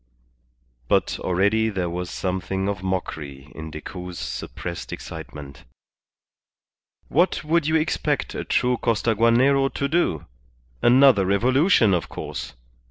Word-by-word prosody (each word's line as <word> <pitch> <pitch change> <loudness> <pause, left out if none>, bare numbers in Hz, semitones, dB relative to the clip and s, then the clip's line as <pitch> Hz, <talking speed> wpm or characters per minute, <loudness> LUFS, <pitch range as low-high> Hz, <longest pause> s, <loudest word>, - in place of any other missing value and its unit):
But - - +1
already 100 +5 +2
there 95 -4 -2
was 90 +1 -4
something 95 +1 -2
of 100 -2 -2
mockery 75 -7 -4
in 80 0 -7
Decoud's 90 +3 -8
suppressed 85 +8 -6
excitement. 70 -2 -8 1.4
"What 175 +4 +1
would 160 0 +1
you 160 - +2
expect 160 +1 0
a - - -4
true 125 0 +1
Costaguanero 115 +5 +2
to 140 - 0
do? 145 - 0 0.6
Another 125 -4 +6
revolution, 120 - +3
of 85 -3 -1
course. - - -6
100 Hz, 110 wpm, -23 LUFS, 90-130 Hz, 1.4 s, Another